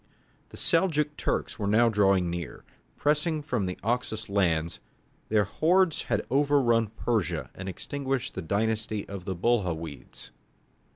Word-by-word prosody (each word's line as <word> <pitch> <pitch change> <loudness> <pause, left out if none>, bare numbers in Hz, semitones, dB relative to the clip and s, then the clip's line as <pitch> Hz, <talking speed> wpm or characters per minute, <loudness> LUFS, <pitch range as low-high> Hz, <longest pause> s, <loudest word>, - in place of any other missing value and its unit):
The - - -12
Seljouk 155 -4 +2
Turks - - -2
were 100 - -1
now 110 +4 +5
drawing 100 -4 +3
near. 85 -2 -6 0.3
Pressing 150 +2 +1
on 155 - -3
from 125 -9 -1
the 90 - -4
Oxus 110 -2 -2
lands, 85 -5 +1 0.5
their 105 -1 +4
hordes 170 - +2
had - - -1
overrun 135 -5 +3
Persia 90 - -2
and 95 0 -6
extinguished 135 +4 -3
the 95 - -4
dynasty 110 +3 -1
of 95 -2 -7
the 95 -2 -3
Buhawides. 85 -8 -2
110 Hz, 135 wpm, -28 LUFS, 95-135 Hz, 0.5 s, now